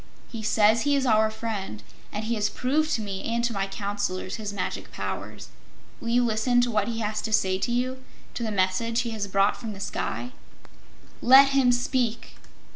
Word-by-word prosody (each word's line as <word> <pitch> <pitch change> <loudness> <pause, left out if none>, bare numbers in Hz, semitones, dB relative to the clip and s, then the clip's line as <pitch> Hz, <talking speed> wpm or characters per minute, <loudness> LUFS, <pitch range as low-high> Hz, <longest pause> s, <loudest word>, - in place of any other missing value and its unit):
He 230 -3 -5
says 220 +1 +3
he 285 +2 +2
is 275 -1 +1
our 220 -2 +4
friend, 215 - -5 0.3
and 210 - -4
he 230 - -1
has 210 -2 0
proved 305 +5 0
to 220 - -3
me 195 -2 -5
and 235 +1 -1
to 235 -1 0
my 195 -1 -1
Counselors 200 -1 -3
his 210 -2 -4
magic 200 -2 -4
powers. - - -6 0.5
Will - - -8
you 245 +1 +3
listen 235 +2 +2
to 245 0 0
what 210 -2 +1
he 230 -1 -3
has 210 0 -2
to 220 - -4
say 190 -3 +2
to 240 - -1
you 255 +2 -1 0.3
to - - -5
the 225 - -1
message 205 +4 +1
he 235 -1 -4
has 215 -2 -3
brought 195 +1 +2
from 225 -3 -6
the 195 - -10
sky?" 245 +4 -3 0.9
"Let 270 +3 +8
him 270 -2 +4
speak!" 245 -1 -1
220 Hz, 200 wpm, -26 LUFS, 205-245 Hz, 0.9 s, Let